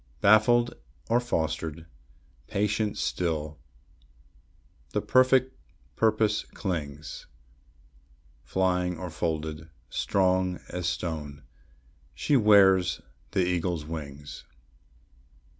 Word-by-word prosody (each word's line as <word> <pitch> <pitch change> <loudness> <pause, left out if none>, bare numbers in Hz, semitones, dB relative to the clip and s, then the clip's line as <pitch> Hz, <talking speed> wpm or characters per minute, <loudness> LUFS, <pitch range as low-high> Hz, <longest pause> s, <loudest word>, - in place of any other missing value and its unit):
Baffled 120 +5 +5 0.4
or 120 - +5
fostered, 80 -7 -2 0.6
patient 105 +1 0
still, 80 -3 -2 1.3
the - - +2
perfect 130 0 +4 0.4
purpose 110 -1 +2
clings; 75 -6 -5 1.2
Flying 90 -2 0
or 90 0 -6
folded, 80 0 -3 0.2
strong 95 -1 +1
as 90 -2 -3
stone, 75 -5 -5 0.7
she 145 - +1
wears 100 -5 +5 0.3
the 95 -3 +2
eagle's 85 -3 -1
wings. 75 -2 -7
90 Hz, 75 wpm, -27 LUFS, 80-105 Hz, 1.3 s, Baffled